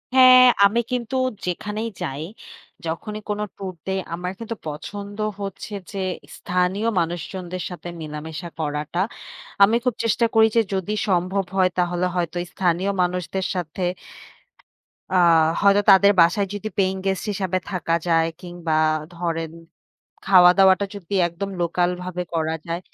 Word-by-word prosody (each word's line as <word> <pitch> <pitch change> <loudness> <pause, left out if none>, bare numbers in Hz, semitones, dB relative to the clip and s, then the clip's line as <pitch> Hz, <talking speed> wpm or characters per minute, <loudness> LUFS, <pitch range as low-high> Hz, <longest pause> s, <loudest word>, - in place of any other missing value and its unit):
হ্যাঁ, 255 -1 +9 0.2
আমি 210 +4 +3
কিন্তু 245 0 -2 0.3
যেখানেই 210 +5 -3
যাই, 140 +3 -3 0.6
যখনই 170 +6 -4
কোন 210 0 -1 0.2
টুর 190 -2 -6
দেই 190 0 0
আমার 180 +1 -3
কিন্তু 230 0 -5
পছন্দ 200 +7 -7 0.2
হচ্ছে 200 +1 -6 0.2
যে, 200 - -7 0.4
স্থানীয় 180 +4 0
মানুষজনদের 175 +2 -4
সাথে 175 -1 -8
মেলামেশা 155 +3 -6
করাটা। 150 +2 -3 0.6
আমি 215 +3 +5
খুব 250 - +2
চেষ্টা 230 +1 +2
করি 220 0 +7
যে, 230 - +6
যদি 195 +2 -1 0.2
সম্ভব 185 +2 +1
হয় 185 -1 +4
তাহলে 175 0 +1
হয়তো 175 -1 -2
স্থানীয় 185 +1 0
মানুষদের 180 +1 -1
সাথে 175 0 -4 1.3
আ - - +4 0.4
হয়তো 200 0 +5
তাদের 200 +1 +7
বাসায় 175 +4 +3
যদি 205 +1 -4
paying 190 -1 +1
guest 190 -1 0
হিসাবে 190 -2 -1
থাকা 180 -3 -1
যায় 165 -1 +3
কিংবা 175 -2 -4 0.4
ধরেন 165 -2 -3 0.8
খাওয়া-দাওয়াটা 190 +1 +6
যদি 200 -1 -6
একদম 190 +4 -5
লোকালভাবে 180 +1 -1
করা 160 -1 0
যায়, 170 +1 -3
185 Hz, 130 wpm, -22 LUFS, 170-200 Hz, 1.3 s, হ্যাঁ